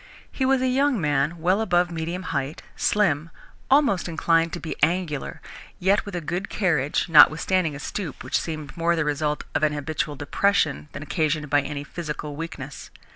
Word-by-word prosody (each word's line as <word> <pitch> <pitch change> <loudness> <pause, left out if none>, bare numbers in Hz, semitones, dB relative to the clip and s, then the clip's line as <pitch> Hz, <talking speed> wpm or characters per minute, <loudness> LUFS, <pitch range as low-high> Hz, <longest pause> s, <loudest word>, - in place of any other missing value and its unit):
He 260 - 0
was 265 -1 +3
a - - +2
young 265 -1 +2
man 150 +1 +1
well 185 +6 +2
above 175 -4 +2
medium 170 +3 -4
height, 140 +2 -3
slim, 165 -7 +1 0.4
almost 265 -11 +3
inclined 165 0 +2
to 175 - -3
be 160 - -5
angular, 165 -3 0 0.4
yet 195 +4 +2
with 200 - -5
a 175 - -2
good 175 +5 -3
carriage 160 -9 0
notwithstanding 165 0 +5
a - - -7
stoop 165 -1 -5
which 130 - 0
seemed 155 -4 -6
more 170 0 +1
the 160 -2 0
result 150 0 -1
of - - 0
an 155 -1 +2
habitual 150 0 -3
depression 150 0 0
than 145 - -6
occasioned 155 -2 -1
by 145 0 +4
any 140 0 -5
physical 150 -1 -6
weakness. 150 -3 -7
160 Hz, 175 wpm, -24 LUFS, 150-180 Hz, 0.4 s, notwithstanding